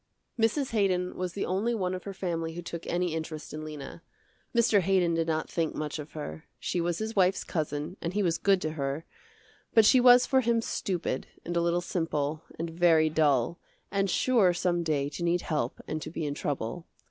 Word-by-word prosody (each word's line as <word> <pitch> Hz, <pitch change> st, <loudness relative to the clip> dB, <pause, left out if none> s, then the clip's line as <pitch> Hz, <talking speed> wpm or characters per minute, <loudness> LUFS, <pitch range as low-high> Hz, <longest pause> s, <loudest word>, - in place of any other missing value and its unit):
Mrs. 240 Hz, +5 st, +1 dB
Haydon 185 Hz, -4 st, +1 dB
was 180 Hz, -1 st, -3 dB
the 200 Hz, -, -2 dB
only 210 Hz, +6 st, 0 dB
one 185 Hz, -4 st, -1 dB
of 185 Hz, -, -6 dB
her 200 Hz, -, -5 dB
family 165 Hz, -3 st, -3 dB
who 175 Hz, -, -6 dB
took 170 Hz, 0 st, -6 dB
any 175 Hz, -1 st, 0 dB
interest 160 Hz, -1 st, -5 dB
in 155 Hz, 0 st, -5 dB
Lena. 155 Hz, +1 st, -8 dB, 0.5 s
Mr. 235 Hz, -3 st, +4 dB
Haydon 185 Hz, -2 st, +2 dB
did 165 Hz, 0 st, 0 dB
not 160 Hz, -1 st, 0 dB
think 165 Hz, -2 st, -1 dB
much 155 Hz, 0 st, -3 dB
of 150 Hz, 0 st, -8 dB
her. 80 Hz, -, -6 dB
She 175 Hz, -, -1 dB
was 170 Hz, 0 st, 0 dB
his 220 Hz, +1 st, -4 dB
wife's 190 Hz, -1 st, +3 dB
cousin 150 Hz, +1 st, -3 dB
and 170 Hz, -, -3 dB
he 205 Hz, -, +2 dB
was 170 Hz, -3 st, +1 dB
good 195 Hz, -2 st, +3 dB
to 155 Hz, -, -1 dB
her, 140 Hz, +1 st, -3 dB, 0.7 s
but 225 Hz, -2 st, +7 dB
she 255 Hz, -, +7 dB
was 245 Hz, 0 st, +7 dB
for 265 Hz, -1 st, +3 dB
him 235 Hz, -1 st, +2 dB
stupid, 180 Hz, -, -2 dB, 0.2 s
and 175 Hz, -, -3 dB
a 170 Hz, -, +3 dB
little 170 Hz, +1 st, +1 dB
simple, 155 Hz, -4 st, -2 dB, 0.2 s
and 165 Hz, +1 st, -3 dB
very 165 Hz, -2 st, +4 dB
dull, 150 Hz, 0 st, +2 dB, 0.3 s
and 195 Hz, 0 st, +1 dB
sure 205 Hz, -6 st, +3 dB
some 175 Hz, -1 st, +1 dB
day 150 Hz, -4 st, 0 dB
to 150 Hz, -, -6 dB
need 175 Hz, +1 st, +2 dB
help 150 Hz, -6 st, -2 dB
and 155 Hz, 0 st, -3 dB
to -, -, -5 dB
be 160 Hz, -1 st, -4 dB
in 145 Hz, -, -1 dB
trouble. 145 Hz, +3 st, -3 dB
170 Hz, 205 wpm, -29 LUFS, 155-190 Hz, 0.7 s, but